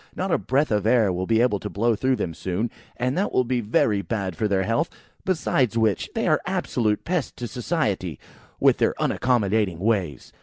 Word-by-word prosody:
Not 190 +1 -2
a - - +2
breath 140 +2 +1
of 105 0 +1
air 110 -5 +4
will 90 +1 -3
be 115 0 +3
able 120 -5 +2
to - - -5
blow 115 +2 +1
through 130 +4 +1
them 85 -8 -3
soon, 95 +8 -2 0.3
and 125 +2 0
that 200 - 0
will 130 - +3
be 125 0 -1
very 105 -1 +2
bad 100 -4 -3
for 105 - 0
their 95 -2 +1
health; 115 - 0 0.4
besides 135 - +1
which, 110 -4 +1
they - - 0
are - - +3
absolute 105 -3 0
pests 175 -4 -1
to 120 - -6
society, 110 - -2 0.4
with - - +4
their - - +2
unaccommodating 105 -7 +1
ways. 95 - -1
110 Hz, 195 wpm, -24 LUFS, 100-125 Hz, 0.4 s, air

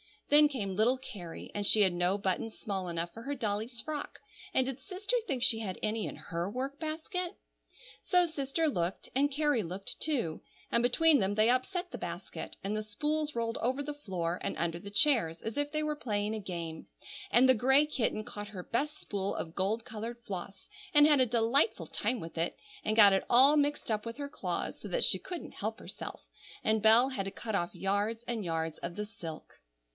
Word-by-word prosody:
Then 295 +1 +8
came 210 -10 -3
little 240 +5 +4
Carrie, 185 -10 -9
and 205 -1 0
she 215 - +7
had 190 -3 +6
no 175 +3 +2
buttons 200 +3 -2
small 195 -4 -3
enough 170 0 -3
for 225 - -9
her 285 +3 -3
dolly's 225 0 -2
frock, 295 +4 -6 0.3
and 260 - +4
did 265 0 -4
sister 390 - -3
think 260 -4 -1
she 240 -3 +3
had 195 -5 -4
any 215 0 0
in - - -6
her 170 +2 -3
work 265 +5 -4
basket? 330 +3 -3 0.7
So 360 -1 +4
sister 315 0 -1
looked, 180 - -2
and 280 +2 +3
Carrie 290 -3 +1
looked, 190 +2 -5
too, 245 - 0 0.3
and 235 - +4
between 295 +5 +5
them 200 0 0
they 215 +2 +4
upset 350 +9 0
the - - -5
basket, - - -6
and 200 +2 -2
the 215 - -1
spools 300 +8 -2
rolled 230 0 -1
over 260 +4 -1
the 295 +1 -4
floor 180 -11 -3
and - - -3
under 170 0 -1
the 200 - -9
chairs, 205 - +4
as 225 - -5
if 290 0 0
they 305 0 0
were 300 -1 -2
playing 210 -5 -1
a 220 - -3
game; 170 -5 -6 0.4
and 250 +2 +6
the 260 - +8
gray 265 +5 +5
kitten 240 -7 -1
caught 205 -1 -6
her 195 -4 -7
best 295 +9 -2
spool 200 -1 -3
of 160 - -5
gold 205 +5 0
colored 230 +2 -6
floss, 190 -1 -7 0.3
and 295 0 +8
had 295 -2 +5
a 255 - +5
delightful 235 - +2
time 250 - -1
with 165 0 -9
it, 165 - 0 0.3
and 215 - +1
got 205 -3 +8
it 195 - +1
all 265 +5 +7
mixed 290 -4 0
up 215 0 -1
with 230 +2 -6
her 285 -1 -5
claws 305 - -3
so - - -8
that - - +1
she - - +4
couldn't 355 -2 -7
help - - -3
herself, - - -8 0.4
and 220 0 +2
Bell 225 +4 +6
had 230 -8 -3
to 195 - -4
cut 220 +1 -6
off 175 -3 -1
yards 205 +4 -1
and 230 -3 -2
yards 160 -1 -2
of 170 0 -5
the 210 +1 -3
silk. 170 -7 -9
225 Hz, 210 wpm, -31 LUFS, 195-280 Hz, 0.7 s, Then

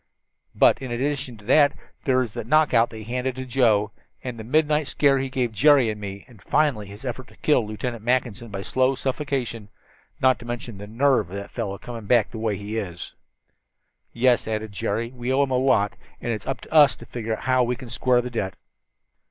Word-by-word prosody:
"But, - - +4
in 130 -2 -5
addition 130 -1 -2
to 105 - -17
that, 145 +4 +5 0.3
there 130 -3 +3
is 115 -4 -7
that - - -5
knockout 125 -5 +4
that 110 - -10
he 110 - -8
handed 125 +3 -2
to 130 0 -5
Joe, 115 -5 +2 0.3
and 125 -3 -5
the - - -6
midnight 150 +4 +2
scare 140 0 +3
he 135 0 -2
gave 125 -3 -1
Jerry 130 +1 +5
and 105 0 -8
me, 100 -1 -7
and 115 -6 -18
finally 140 -9 +1
his 100 +6 -11
effort 125 0 -5
to - - -18
kill 130 -8 +2
Lieutenant 115 +1 -5
Mackinson 120 -2 0
by 100 -1 -5
slow 130 +4 +1
suffocation, 130 -6 -3 0.5
not 130 -1 +3
to 120 - -11
mention 120 -3 -6
the 105 - -8
nerve 130 -2 +2
of 95 - -7
the 100 - -6
fellow 110 -5 -4
in - - -7
coming 115 -4 -8
back 120 -2 +3
the 110 - -6
way 110 -3 -1
he 100 +2 -7
has." 90 -5 -5 1.0
"Yes," 120 -1 +2
added 110 -1 -3
Jerry, 110 +4 -2
"we 125 0 -4
owe 135 +2 +3
him 135 - -2
a 130 - +2
lot, 110 -6 +2 0.3
and 120 - -3
it 110 -2 -2
is - - -16
up 135 -3 -3
to - - -11
us 150 -3 +7
to - - -13
figure 115 -2 -3
out - - -11
how 130 -1 +3
we 125 0 +1
can 125 0 -10
square 125 +1 +2
the 125 0 -6
debt." 95 -6 -3
120 Hz, 225 wpm, -24 LUFS, 110-130 Hz, 1.0 s, us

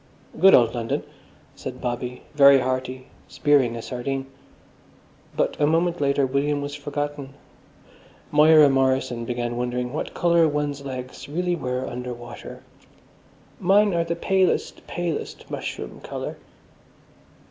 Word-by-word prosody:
"Good 190 +3 +8
old 115 -2 +4
London," 120 +4 -2 0.5
said 130 -2 -7
Bobby, 125 0 -4
very 140 -2 +7
hearty, 130 0 -3 0.2
spearing 140 -6 +2
a 115 - -6
sardine. 135 +2 -3 1.1
But - - +1
a 145 - +4
moment 170 +1 +1
later 140 -1 +2
William 140 +2 0
was 145 0 -5
forgotten. 145 -1 -5 1.0
Moira 150 0 +7
Morrison 130 -3 +1
began 120 0 -3
wondering 125 +1 -2
what 155 - -4
colour 170 -1 +4
one's 145 -1 -2
legs 130 0 -7
really 175 +3 -1
were 125 -4 -3
under 125 0 -5
water. 120 0 -10 1.0
"Mine 200 +2 +4
are 170 -1 +2
the 170 0 -2
palest, 190 +2 0
palest 175 -3 -4
mushroom - - -5
colour." - - -6
140 Hz, 125 wpm, -24 LUFS, 125-155 Hz, 1.1 s, Good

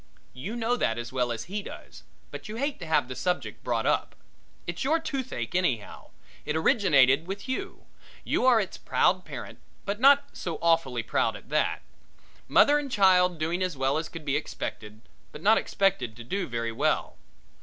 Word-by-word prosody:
You 175 - -6
know 240 +1 0
that 115 - 0
as 120 +1 -6
well 125 -2 0
as 110 -2 -4
he 200 - -4
does, - - -11 0.3
but - - -8
you 215 - -5
hate 280 +4 -2
to 170 - -7
have 150 -5 +2
the 130 - -6
subject 180 +4 -2
brought - - -1
up. - - 0 0.5
It's - - -4
your 310 +5 +2
toothache 260 - -4
anyhow. 135 - -1 0.3
It 150 - -2
originated 160 - +4
with 200 +4 -6
you. 260 - -5 0.4
You - - 0
are 245 -3 +6
its 195 -3 -4
proud - - +1
parent - - -8 0.3
but 205 +1 -2
not 280 +2 +6
so 170 -3 -4
awfully 165 -8 +1
proud - - 0
at - - -13
that. - - 0 0.6
Mother 295 +1 +5
and 280 -2 -6
child 185 -4 +4
doing 165 +4 -1
as 180 -5 -1
well 135 +3 +1
as 160 -1 -5
could 165 -2 -9
be 140 -1 0
expected, 110 -7 -5 0.3
but 150 - -11
not 220 +2 +5
expected 195 - 0
to 120 - -10
do 185 +9 -3
very 115 -1 -3
well. 115 - 0
170 Hz, 185 wpm, -27 LUFS, 130-210 Hz, 0.6 s, are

